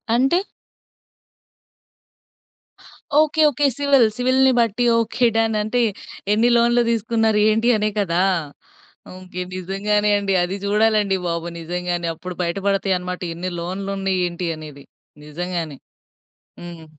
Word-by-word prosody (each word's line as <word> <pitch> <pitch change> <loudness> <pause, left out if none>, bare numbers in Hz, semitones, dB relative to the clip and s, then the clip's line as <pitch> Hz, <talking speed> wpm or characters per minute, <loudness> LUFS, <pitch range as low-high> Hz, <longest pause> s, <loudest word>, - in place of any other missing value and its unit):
అంటే? 270 +9 +3 2.8
Okay, 310 0 +2
okay. 290 +1 0
Civil 280 -4 +4
సివిల్‌ని 260 +1 +3
బట్టి 235 +1 +1
okay. 240 +2 0
Done. 225 -1 +1
అంటే 245 +3 0 0.5
ఎన్ని 230 +3 +3
లోన్‌లు 240 +1 +3
తీసుకున్నారు? 225 -1 +1
ఏంటి 225 +2 +1
అనే 210 0 0
కదా! 180 -2 +1 0.9
ఓకె. 180 -1 -7
నిజంగానే 205 +3 0
అండి. 195 -1 -1
అది 185 +2 -3
చూడాలండి 210 -2 +2
బాబు. 170 0 -3
నిజంగానే. 175 0 -3
అప్పుడు 180 +1 -8
బయట 170 +3 -2
పడతాయి 195 -1 +1
అన్నమాట. 180 0 -6
ఎన్ని 180 +2 -4
లోన్‌లు 190 +3 -5
ఉన్నాయి? 190 -1 0
ఏంటి? 170 0 -4
అనేది. 145 -3 -11 0.4
నిజంగానే. 165 -2 -4 0.8
హ్మ్. 170 -2 -10
200 Hz, 115 wpm, -21 LUFS, 180-230 Hz, 2.8 s, Civil